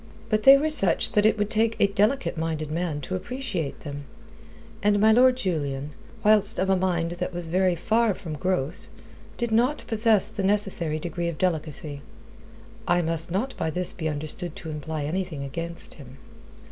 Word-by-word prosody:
But 215 Hz, 0 st, +2 dB
they 270 Hz, +4 st, +9 dB
were 310 Hz, +2 st, 0 dB
such 195 Hz, -, +3 dB
that 210 Hz, 0 st, +4 dB
it 220 Hz, -, +2 dB
would 205 Hz, 0 st, -1 dB
take 225 Hz, +1 st, +2 dB
a -, -, +5 dB
delicate 210 Hz, +6 st, 0 dB
minded 160 Hz, -2 st, -3 dB
man 165 Hz, -2 st, -2 dB
to 185 Hz, -, -6 dB
appreciate 220 Hz, -, -4 dB
them; 145 Hz, -1 st, -7 dB, 0.8 s
and 205 Hz, 0 st, +2 dB
my 220 Hz, +2 st, +5 dB
Lord 250 Hz, +2 st, +5 dB
Julian, 145 Hz, -, -3 dB, 0.3 s
whilst 210 Hz, 0 st, +4 dB
of 190 Hz, +1 st, +1 dB
a -, -, +4 dB
mind 175 Hz, -3 st, 0 dB
that 175 Hz, +1 st, -4 dB
was 175 Hz, -1 st, -5 dB
very 180 Hz, +2 st, +1 dB
far 220 Hz, +4 st, +1 dB
from 165 Hz, -3 st, -7 dB
gross, 165 Hz, 0 st, -1 dB, 0.5 s
did 235 Hz, -1 st, -2 dB
not 245 Hz, +7 st, +1 dB
possess 220 Hz, -3 st, +3 dB
the 220 Hz, -2 st, -5 dB
necessary 190 Hz, -6 st, +2 dB
degree 170 Hz, +2 st, -4 dB
of 170 Hz, -2 st, -4 dB
delicacy. 155 Hz, -4 st, -2 dB, 0.9 s
I 175 Hz, -, +2 dB
must 165 Hz, 0 st, 0 dB
not 210 Hz, +10 st, -2 dB
by -, -, -1 dB
this 180 Hz, +3 st, 0 dB
be 160 Hz, -3 st, -3 dB
understood 155 Hz, +3 st, -4 dB
to 160 Hz, -, -7 dB
imply 150 Hz, 0 st, -4 dB
anything 165 Hz, -1 st, -3 dB
against 165 Hz, +4 st, -5 dB
him. 135 Hz, -3 st, -13 dB
180 Hz, 175 wpm, -25 LUFS, 160-215 Hz, 0.9 s, they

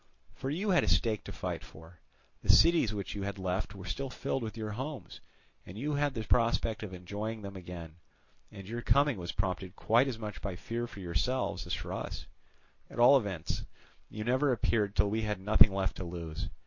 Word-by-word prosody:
For 135 Hz, -, -4 dB
you 190 Hz, +8 st, 0 dB
had 175 Hz, -, +5 dB
a -, -, -1 dB
stake 110 Hz, -2 st, +2 dB
to -, -, -6 dB
fight -, -, -4 dB
for; 80 Hz, +1 st, -14 dB, 0.4 s
the -, -, -9 dB
cities 165 Hz, -9 st, +6 dB
which 100 Hz, -2 st, -4 dB
you 100 Hz, -, -4 dB
had 100 Hz, 0 st, -3 dB
left 95 Hz, +2 st, -2 dB
were 95 Hz, -1 st, -9 dB
still 130 Hz, +10 st, -3 dB
filled 135 Hz, +1 st, -2 dB
with 110 Hz, -1 st, -5 dB
your 110 Hz, -1 st, -3 dB
homes, 130 Hz, +6 st, -6 dB, 0.4 s
and 90 Hz, -, -10 dB
you 145 Hz, +6 st, -1 dB
had 145 Hz, -1 st, +1 dB
the 110 Hz, -, -2 dB
prospect 115 Hz, -1 st, +2 dB
of 105 Hz, -4 st, -5 dB
enjoying 105 Hz, +4 st, -5 dB
them 100 Hz, 0 st, -7 dB
again; 85 Hz, -3 st, -8 dB, 0.5 s
and 95 Hz, -1 st, -10 dB
your 120 Hz, +2 st, -4 dB
coming 140 Hz, -1 st, +3 dB
was 85 Hz, -1 st, -3 dB
prompted 95 Hz, -1 st, -2 dB
quite 120 Hz, +5 st, +3 dB
as 125 Hz, -4 st, -2 dB
much 105 Hz, -2 st, -6 dB
by 100 Hz, -3 st, -3 dB
fear 120 Hz, +6 st, -3 dB
for 100 Hz, -, -10 dB
yourselves 95 Hz, +9 st, -1 dB
as -, -, 0 dB
for -, -, -5 dB
us; -, -, -5 dB, 0.6 s
at -, -, -11 dB
all 120 Hz, +4 st, +8 dB
events, 100 Hz, -, -1 dB, 0.5 s
you 110 Hz, -, -5 dB
never 130 Hz, +4 st, +2 dB
appeared 105 Hz, -3 st, +1 dB
till 105 Hz, +1 st, +4 dB
we 110 Hz, +1 st, +1 dB
had 105 Hz, -2 st, -1 dB
nothing 105 Hz, +1 st, +6 dB
left 95 Hz, -1 st, -1 dB
to -, -, -4 dB
lose. 85 Hz, -2 st, -5 dB
105 Hz, 205 wpm, -32 LUFS, 95-120 Hz, 0.6 s, all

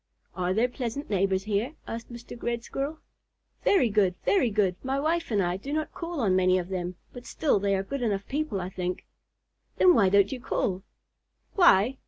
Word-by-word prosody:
'" -, -, -47 dB
"Are 180 Hz, -1 st, -1 dB
there 225 Hz, +6 st, +2 dB
pleasant 250 Hz, +1 st, -5 dB
neighbors 190 Hz, -1 st, +1 dB
here?" 215 Hz, +8 st, -1 dB
asked 230 Hz, +1 st, -7 dB
Mr. 235 Hz, 0 st, -10 dB
Red 235 Hz, -1 st, -2 dB
Squirrel. 280 Hz, +5 st, -4 dB, 0.7 s
"Very 380 Hz, -11 st, +4 dB
good, 195 Hz, -3 st, +2 dB
very 295 Hz, -12 st, +3 dB
good. 200 Hz, -4 st, +1 dB
My 270 Hz, +1 st, -1 dB
wife 330 Hz, +3 st, 0 dB
and 205 Hz, -4 st, +1 dB
I 175 Hz, +1 st, -1 dB
do 270 Hz, +9 st, -7 dB
not 310 Hz, +1 st, -2 dB
call 335 Hz, -4 st, -4 dB
on 195 Hz, -5 st, +2 dB
many 185 Hz, 0 st, +4 dB
of 180 Hz, 0 st, -3 dB
them, 180 Hz, -1 st, -3 dB, 0.2 s
but 245 Hz, -1 st, -10 dB
still 285 Hz, -10 st, +1 dB
they 200 Hz, 0 st, +1 dB
are 190 Hz, -, -1 dB
good 275 Hz, +6 st, -5 dB
enough 200 Hz, -4 st, -1 dB
people, 290 Hz, -7 st, -2 dB
I 180 Hz, 0 st, -4 dB
think." 180 Hz, -1 st, -4 dB, 0.7 s
"Then 365 Hz, -, +6 dB
why 200 Hz, -, +4 dB
don't 200 Hz, 0 st, +4 dB
you 265 Hz, -, -4 dB
call?" 190 Hz, -6 st, -1 dB, 0.7 s
"Why? 265 Hz, -, +4 dB
220 Hz, 200 wpm, -27 LUFS, 190-275 Hz, 0.7 s, Then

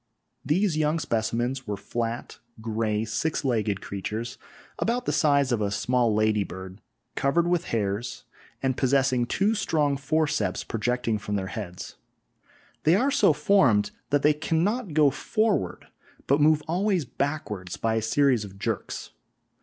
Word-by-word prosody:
These 165 Hz, +4 st, +1 dB
young 155 Hz, +1 st, +2 dB
specimens 120 Hz, 0 st, -1 dB
were 105 Hz, -1 st, -2 dB
flat, 115 Hz, +3 st, -4 dB, 0.2 s
grey, 110 Hz, -1 st, -1 dB
six 125 Hz, +8 st, -2 dB
legged 110 Hz, -6 st, 0 dB
creatures 110 Hz, +4 st, -5 dB, 0.4 s
about 240 Hz, +2 st, 0 dB
the -, -, +1 dB
size 140 Hz, -3 st, +3 dB
of 115 Hz, -3 st, +1 dB
a 100 Hz, -, +1 dB
small 120 Hz, +3 st, +1 dB
lady 110 Hz, -1 st, +2 dB
bird, 95 Hz, +2 st, -9 dB, 0.3 s
covered 165 Hz, +5 st, +1 dB
with 175 Hz, -1 st, +1 dB
hairs, 105 Hz, +1 st, -2 dB, 0.4 s
and 130 Hz, -1 st, +1 dB
possessing 130 Hz, -2 st, +2 dB
two 205 Hz, -, +1 dB
strong 155 Hz, -9 st, +1 dB
forceps 150 Hz, +2 st, 0 dB
projecting 115 Hz, 0 st, -1 dB
from 105 Hz, 0 st, -3 dB
their 95 Hz, -2 st, -3 dB
heads. 95 Hz, -5 st, -7 dB, 0.8 s
They 160 Hz, +3 st, +4 dB
are 260 Hz, +8 st, +2 dB
so -, -, +5 dB
formed 150 Hz, -, +3 dB, 0.2 s
that 145 Hz, -1 st, +2 dB
they 150 Hz, -, +5 dB
cannot 165 Hz, +6 st, -1 dB
go 150 Hz, -3 st, +5 dB
forward, 210 Hz, -, -1 dB, 0.4 s
but 140 Hz, +2 st, +3 dB
move 155 Hz, 0 st, +4 dB
always 180 Hz, -1 st, +1 dB
backward 120 Hz, -10 st, -3 dB
by 115 Hz, 0 st, +1 dB
a 110 Hz, -, +1 dB
series 125 Hz, +1 st, +2 dB
of 100 Hz, -1 st, -10 dB
jerks. -, -, -4 dB
130 Hz, 145 wpm, -26 LUFS, 110-155 Hz, 0.8 s, so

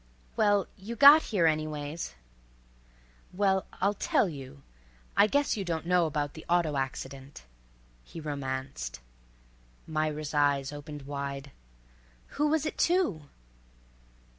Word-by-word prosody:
"Well—you 205 Hz, +1 st, 0 dB
got 285 Hz, +6 st, +9 dB
here, 195 Hz, -, 0 dB
_any_ways." 155 Hz, -, -2 dB, 1.2 s
"Well—I'll 195 Hz, +1 st, +1 dB
tell 205 Hz, -, +1 dB
you. 140 Hz, -3 st, -9 dB, 0.5 s
I 210 Hz, -, +6 dB
guess 285 Hz, +4 st, +1 dB
you 205 Hz, -, -3 dB
don't 165 Hz, -2 st, -3 dB
know 175 Hz, -1 st, +3 dB
about 145 Hz, -1 st, -2 dB
the 160 Hz, -, -10 dB
auto 170 Hz, -4 st, +2 dB
accident," 135 Hz, +1 st, -5 dB, 0.6 s
he 165 Hz, -, -10 dB
romanced. 130 Hz, -, -4 dB, 0.9 s
Myra's 155 Hz, -1 st, -2 dB
eyes 145 Hz, -2 st, +2 dB
opened 145 Hz, 0 st, -8 dB
wide. 140 Hz, 0 st, -5 dB, 0.8 s
"Who 295 Hz, +1 st, 0 dB
was 310 Hz, 0 st, +1 dB
it 310 Hz, -, -4 dB
to?" 270 Hz, -, +1 dB
155 Hz, 110 wpm, -29 LUFS, 140-195 Hz, 1.2 s, got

